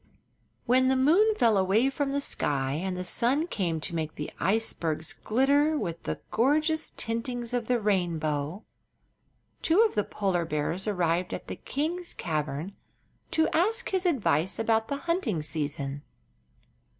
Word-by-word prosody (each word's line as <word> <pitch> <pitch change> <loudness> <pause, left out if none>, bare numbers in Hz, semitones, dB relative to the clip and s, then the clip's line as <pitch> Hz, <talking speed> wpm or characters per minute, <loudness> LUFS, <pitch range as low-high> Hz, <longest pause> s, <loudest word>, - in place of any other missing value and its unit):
When 255 +1 +4
the 265 - +3
moon 355 +12 +4
fell 230 - +3
away 210 +8 +3
from 280 0 -1
the 280 +1 0
sky 135 - 0
and 180 +4 -2
the 180 - -3
sun 250 - +1
came 175 - -2
to 170 - -6
make 160 -2 -3
the 150 - -5
icebergs 165 -6 0
glitter 285 +6 +2
with 170 - -4
the - - -4
gorgeous 305 +6 +2
tintings 235 +1 -3
of 240 -2 -1
the 245 -1 +2
rainbow, 170 -4 -1 1.0
two 335 +6 +4
of 455 - +3
the 210 - +1
polar 190 -5 -1
bears 165 +5 -2
arrived 180 -3 0
at - - -8
the - - -5
king's 340 +5 -3
cavern 155 +2 -3 0.6
to 320 0 +2
ask 440 +8 +2
his 375 -1 +1
advice 190 - +1
about 225 0 +1
the 280 - -2
hunting 270 - 0
season. 145 -2 -3
215 Hz, 150 wpm, -28 LUFS, -, 1.0 s, When